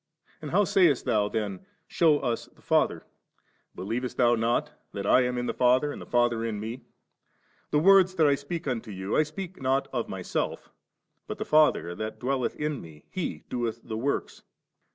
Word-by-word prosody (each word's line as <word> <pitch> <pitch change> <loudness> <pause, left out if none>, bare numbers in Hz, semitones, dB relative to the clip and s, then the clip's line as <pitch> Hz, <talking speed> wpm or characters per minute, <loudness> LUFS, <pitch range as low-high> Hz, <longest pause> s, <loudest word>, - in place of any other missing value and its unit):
And 150 - -6
how 205 +6 +3
saycst 175 -8 +3
thou 105 -2 +1
then, 100 -4 -3 0.2
Shew 160 -3 +4
us 120 -5 -2
the - - -25
Father? - - +1 0.7
Believest 120 +6 -4
thou 120 -1 +4
not, 115 +1 0 0.2
that 100 -1 -4
I 125 - +5
am 125 0 -1
in 125 - -2
the - - -2
Father 130 +4 +3
and - - -8
the - - -10
Father 120 -1 +2
in 110 -3 -3
Me? 115 +4 -6 0.9
the - - +1
words 185 +3 +5
that 160 - +4
I 145 - +5
speak 145 +3 -4
unto 115 -4 -3
you, 95 0 -3
I - - +5
speak 170 +3 -6
not 135 +1 +1
of 120 -3 -2
Myself, 95 -2 -3 0.6
but - - -5
the - - -4
Father 150 - +3
thatdwelleth 125 +5 -2
in 150 -2 -3
Me, 80 -2 -14
He 185 -3 -4
doeth 120 -2 -3
the 110 - -5
works. 135 +6 -2
125 Hz, 180 wpm, -27 LUFS, 110-150 Hz, 0.9 s, I